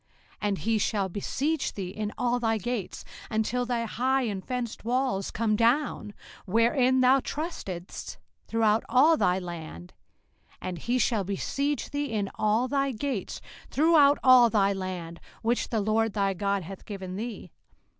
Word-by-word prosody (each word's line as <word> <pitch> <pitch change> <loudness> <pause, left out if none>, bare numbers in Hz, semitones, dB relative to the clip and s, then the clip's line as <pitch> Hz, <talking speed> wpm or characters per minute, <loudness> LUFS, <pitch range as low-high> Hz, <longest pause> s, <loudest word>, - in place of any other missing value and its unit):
05:028:052 - - -28
And 205 -2 0
he 225 +2 0
shall 200 -2 0
besiege 275 - -2
thee 190 -3 -5
in 210 +2 -4
all 245 0 +1
thy 225 -2 +1
gates, 215 -2 -4 0.2
until 235 +3 0
thy 240 -2 0
high 260 +4 0
and 200 -5 -3
fenced 250 -3 -4
walls 245 -4 0
come 220 -1 0
down, 230 -2 +1 0.3
wherein 245 +5 +3
thou 260 +2 +5
trustedst, 225 - -6 0.3
throughout 225 -1 +2
all 280 +7 +5
thy 180 -11 +2
land: 165 - -7 0.7
and 180 -2 -5
he 240 +9 0
shall 225 -4 +1
besiege 275 +9 -2
thee 285 -2 -2
in 205 -3 -2
all 215 +4 +1
thy 275 0 0
gates 255 -3 -4 0.3
throughout 295 -1 +5
all 255 -2 +7
thy 200 -3 +2
land, 180 -3 -5 0.2
which 235 +2 0
the 225 - 0
LORD 215 +1 +1
thy 195 -2 +1
God 200 +1 -1
hath 190 +3 -9
given 190 -3 -6
thee. 210 -4 -6
225 Hz, 155 wpm, -27 LUFS, 195-255 Hz, 0.7 s, all